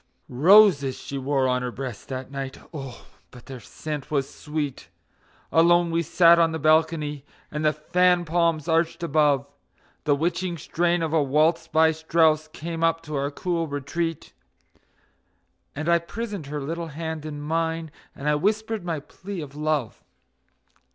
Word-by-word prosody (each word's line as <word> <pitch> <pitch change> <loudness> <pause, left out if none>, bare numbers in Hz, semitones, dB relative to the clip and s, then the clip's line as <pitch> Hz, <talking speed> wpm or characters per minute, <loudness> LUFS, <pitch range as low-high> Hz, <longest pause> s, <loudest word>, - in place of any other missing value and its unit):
Roses 150 -1 +5
she 140 - -6
wore 135 0 +1
on 125 0 +1
her 125 - -2
breast 125 -4 -7
that 130 0 -5
night. 135 -1 -5 0.2
Oh, 135 -5 -8 0.2
but 125 -2 -15
their 130 -2 -8
scent 150 +5 -7
was 140 -3 0
sweet! 150 -3 -5 0.6
Alone 170 +1 +4
we 165 0 +1
sat 170 +1 +5
on 165 -1 +4
the 160 - -2
balcony, 155 -2 +1 0.3
and 150 0 -3
the 155 - +4
fan 180 +3 +2
palms 165 -1 +1
arched 165 +1 +1
above; 145 -3 +2 0.6
The 145 -2 +3
witching 170 +3 -1
strain 170 +2 0
of 160 -1 -2
a 160 - +4
waltz 155 +4 +2
by 160 0 +4
Strauss 160 -1 +2
came 165 +1 -5
up 165 0 +1
to 150 -1 -6
our 140 0 -1
cool 165 +2 -2
retreat, 160 +3 -4 1.4
And 155 +3 -4
I 170 0 +4
prisoned 205 -2 -6
her 145 0 -4
little 165 +3 -4
hand 160 0 -5
in 150 -1 -6
mine, 160 +1 -2 0.2
and 140 - -6
I 150 - +4
whispered 215 +6 0
my 165 -3 -2
plea 195 +6 -8
of 145 -4 -7
love. 150 -6 -2
155 Hz, 160 wpm, -24 LUFS, 145-170 Hz, 1.4 s, Roses